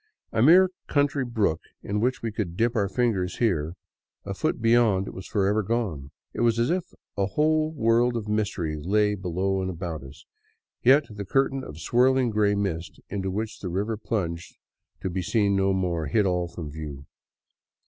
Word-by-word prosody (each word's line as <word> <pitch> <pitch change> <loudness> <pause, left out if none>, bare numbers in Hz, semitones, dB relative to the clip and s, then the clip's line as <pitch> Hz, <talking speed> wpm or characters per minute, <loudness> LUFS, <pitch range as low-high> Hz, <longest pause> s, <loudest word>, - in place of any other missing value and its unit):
A 110 - +1
mere 180 +7 +7 0.2
country 145 -1 +1
brook 110 -10 0 0.2
in 105 +1 -1
which 125 +3 0
we 115 - -1
could 100 -6 -4
dip 115 +3 +1
our 100 -3 +1
fingers 100 -6 0
here, 85 -8 0 0.5
a - - -3
foot - - -1
beyond 115 -4 +3
it - - -7
was 95 - -8
forever 105 0 +1
gone. 95 - -2 0.2
It - - -3
was 115 -1 +3
as 120 +5 +2
if 180 -1 0 0.3
a 100 -1 +1
whole 155 +7 +2
world 120 -2 +2
of 110 -2 -5
mystery 100 -7 -1
lay 105 +5 +2
below 95 0 -1
and 95 - -2
about 85 -3 -5
us, 65 +2 -13 0.6
yet 140 +4 +5
the 105 -1 -6
curtain 135 +5 +1
of 75 - -9
swirling 125 +7 +3
gray 105 -1 +2
mist 90 -5 -3
into 95 -1 -2
which 110 +3 -4
the 95 - -4
river 100 +6 -1
plunged 85 -6 -4 0.4
to 95 - -2
be 95 +1 -2
seen 100 +2 +1
no 95 0 +2
more 90 -4 -1
hid 105 +8 +2
all 90 -2 0
from 80 -3 -7
view. 70 -2 -7
105 Hz, 180 wpm, -26 LUFS, 90-115 Hz, 0.6 s, mere